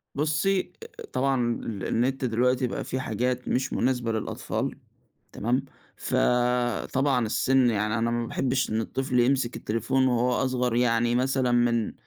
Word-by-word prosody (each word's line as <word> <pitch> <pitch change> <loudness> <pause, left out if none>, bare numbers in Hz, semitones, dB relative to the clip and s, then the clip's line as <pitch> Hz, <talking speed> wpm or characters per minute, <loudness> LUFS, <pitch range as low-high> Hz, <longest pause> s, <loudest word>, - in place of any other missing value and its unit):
بُصّي، 180 +6 0 0.4
طبعًا 130 -3 +1
ال 100 -4 -5
النت 130 +3 0
دلوقتي 125 +2 +1
بقى - - -4
في 130 - -3
حاجات 125 +1 -2
مش 130 +1 -1
مناسبة 125 -2 0
للأطفال، 110 -1 -3 0.6
تمام؟ 125 +5 -1 0.3
فطبعًا 125 +1 +1
السِنّ، 130 +3 +2
يعني 105 0 0
أنا 115 +1 0
ما 120 0 -1
باحبش 130 +2 -1
إن 110 +1 0
الطفل 130 +2 -1
يمسك 125 -1 +2
التليفون 115 +4 0
وهو 125 0 +2
أصغر 125 -2 0
يعني 120 0 +2
مثلًا 130 0 +1
من 120 -2 +1
125 Hz, 135 wpm, -26 LUFS, 115-130 Hz, 0.6 s, السِنّ